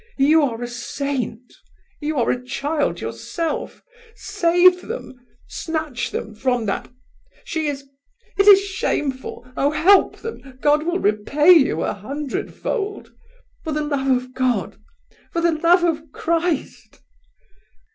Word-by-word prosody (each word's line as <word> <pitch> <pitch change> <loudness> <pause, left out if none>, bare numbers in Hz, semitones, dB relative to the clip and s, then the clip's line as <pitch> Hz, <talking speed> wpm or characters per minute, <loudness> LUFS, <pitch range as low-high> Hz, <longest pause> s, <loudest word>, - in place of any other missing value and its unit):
You 300 +4 +5
are 245 -4 -1
a - - -3
saint! 245 -1 -4 0.5
You 305 0 -3
are 240 - +2
a 250 - -3
child 285 +4 -2
yourself—save 365 -1 0
them! 450 - -7 0.3
Snatch 315 -7 -3
them 215 - -5
from 245 0 -1
that... 200 - -3 0.5
she 320 -2 -2
is... 275 -1 -4 0.5
it 395 - +4
is 400 -1 +10
shameful! 275 -10 -3
Oh! 280 - +2
help 370 +6 +4
them! 270 - -9
God 300 +3 +2
will 345 +1 +1
repay 280 - +3
you 320 -7 +5
a - - -1
hundredfold. 295 - -4 0.5
For 315 - -4
the 300 0 -1
love 285 -2 -2
of 255 0 0
God, 255 -2 -1 0.5
for 335 - -1
the 340 0 +3
love 340 +3 +3
of 320 -2 -1
Christ!" 335 -2 -2
300 Hz, 125 wpm, -21 LUFS, 260-340 Hz, 0.5 s, is